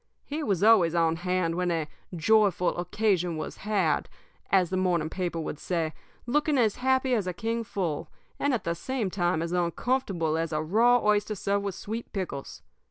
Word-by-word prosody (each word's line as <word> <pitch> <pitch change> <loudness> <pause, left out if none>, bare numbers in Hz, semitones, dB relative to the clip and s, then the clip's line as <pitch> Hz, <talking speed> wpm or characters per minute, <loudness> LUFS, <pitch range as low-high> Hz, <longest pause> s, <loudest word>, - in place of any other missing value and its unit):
He 300 +2 -4
was 200 - 0
always 195 -7 +5
on 165 -1 +2
hand 180 -1 0
when 180 +1 0
'a 165 -3 -1 0.3
joyful 190 0 +3
occasion 180 -2 0
was 155 - -5
had,' 195 -7 0 0.4
as 185 -2 +3
the - - 0
morning 175 -4 +1
paper 175 -3 -2
would 155 -2 -4
say, 165 -3 -1 0.3
looking 295 +3 +1
as 220 -5 +2
happy 260 0 +2
as 210 -6 +1
a 180 - -1
king 230 +5 -2
full, 180 -8 -3 0.3
and 285 - +1
at 245 - -1
the 170 - 0
same 220 +2 -3
time 175 -3 0
as 170 - -4
uncomfortable 175 -2 0
as 165 0 -2
a 155 - 0
raw 230 +9 +4
oyster 210 0 +2
served 200 +1 -1
with 195 -3 -3
sweet 225 +3 -6
pickles. 180 -9 -5
185 Hz, 180 wpm, -27 LUFS, 170-220 Hz, 0.4 s, always